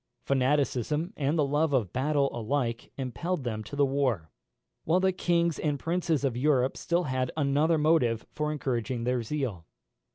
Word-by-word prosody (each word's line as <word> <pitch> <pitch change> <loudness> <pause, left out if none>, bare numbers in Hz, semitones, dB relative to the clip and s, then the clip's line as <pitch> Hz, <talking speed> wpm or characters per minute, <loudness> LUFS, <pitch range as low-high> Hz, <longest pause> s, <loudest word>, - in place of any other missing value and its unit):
Fanaticism 140 +3 +1
and 145 +3 0
the 150 - +3
love 145 +2 +1
of 115 -9 +1
battle 140 +1 +1
alike 120 0 -2
impelled 140 +6 -3
them 110 -3 -3
to 145 - -7
the 145 0 +4
war, 130 - 0 0.5
while 170 +4 +3
the 190 0 +3
kings 170 -2 +1
and 150 -2 0
princes 165 -1 0
of 130 -4 0
Europe 130 0 +2
had - - -12
still 170 -1 0 0.3
another 150 +3 +2
motive 150 -8 +2
for 150 0 -2
encouraging 125 -4 -2
their 125 0 0
zeal. 115 - -3
140 Hz, 160 wpm, -28 LUFS, 125-155 Hz, 0.5 s, the